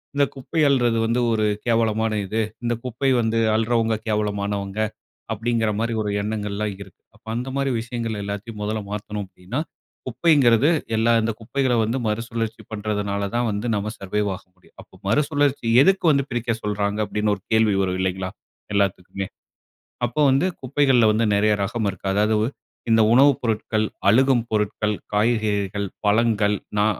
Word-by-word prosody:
இந்த 140 0 +4
குப்பை 135 +5 -4
அள்றது 120 -4 +2
வந்து 115 +2 +1
ஒரு 110 -1 +1 0.2
கேவலமான 110 -1 +2
இது. 110 +4 -1 0.2
இந்த 120 0 +1
குப்பை 130 +2 -1
வந்து 115 0 0 0.2
அள்றவங்க 115 0 +1
கேவலமானவங்க 100 -1 -2 0.5
அப்டிங்கிற 110 0 0
மாரி 115 +1 -1
ஒரு 105 -1 -2
எண்ணங்கள்லாம் 105 -1 -3
இருக்கு. - - -20
அப்போ - - -25
அந்த 125 +3 -3
மாரி 140 -1 0
விஷயங்கள் 115 -3 -4
எல்லாத்தையும் 105 +2 -6
முதல்ல 105 +1 -2
மாத்தணும் 105 0 -4
அப்டின்னா. 95 +8 -6 0.5
குப்பைங்கிறது, 130 -1 +4 0.3
எல்லா 115 +1 +3
இந்த 115 +1 0
குப்பைய 125 +2 0
வந்து 115 +4 -1
மறுசுழற்சி 115 +1 -3
பண்றதுனால 105 -1 -2
தான் 120 0 +1
வந்து 105 +3 -3
நம்ம 105 +1 -2
சர்வைவ் 100 +2 -1
ஆக 95 - -13
முடியும். 90 - -26
அப்போ - - -19
மறுசுழற்சி 145 +1 +1
எதுக்கு 190 +4 +3
வந்து 140 -1 +2
பிரிக்க 120 0 -1
சொல்றாங்க 105 0 -1
அப்டின்னு 105 +1 0
ஒரு 100 - -15
கேள்வி 110 -2 +4
வரும் 95 -1 -1
இல்லைங்களா, 95 0 -1 0.5
எல்லாத்துக்குமே. 100 -1 -1 0.8
அப்போ 120 +6 -1
வந்து 135 +7 +3
குப்பைகள்ல 130 -2 +3
வந்து 110 +2 +1
நெறைய 105 +1 +3
ரகம் 110 +2 -1
இருக்கு. 95 0 -6
அதாவது, 105 +2 +2 0.4
இந்த 115 0 +5
உணவுப் 135 +1 +5
பொருட்கள், 110 -1 0 0.2
அழுகும் 130 +2 +4
பொருட்கள், 105 0 0 0.2
காய்கறிகள், 105 -2 0 0.2
பழங்கள், 105 -1 +3 0.2
நா 105 - +4
110 Hz, 145 wpm, -23 LUFS, 105-120 Hz, 0.8 s, இந்த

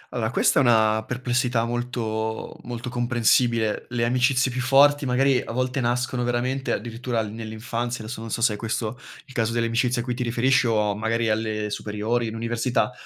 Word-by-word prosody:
Allora 110 -2 0
questa 130 - +3
è - - +4
una 110 -3 +3
perplessità 125 -2 0
molto 115 -2 -3
molto 120 +1 -6
comprensibile, 120 -2 +1
le 120 -1 0
amicizie 125 +2 +2
più 125 +1 -2
forti 140 +2 +4
magari 130 +1 +3
a - - -7
volte 130 +2 -1
nascono 125 +1 0
veramente 125 +2 -1
addirittura 120 0 -2
nell'infanzia, 115 +2 -4
adesso 110 +2 -6
non 115 - -7
so 115 - -3
se 110 - +4
è - - -3
questo 115 +2 -3 0.3
il 135 - -15
caso 115 -2 0
delle 120 0 +1
amicizie 120 +1 +1
a - - -5
cui 125 - -1
ti 125 - -5
riferisci 125 +2 +2
o 105 -3 +1
magari 115 +2 0
alle 110 -1 -1
superiori, 110 +4 -2
in 110 - -5
università, 115 +2 0
120 Hz, 180 wpm, -24 LUFS, 110-125 Hz, 0.3 s, è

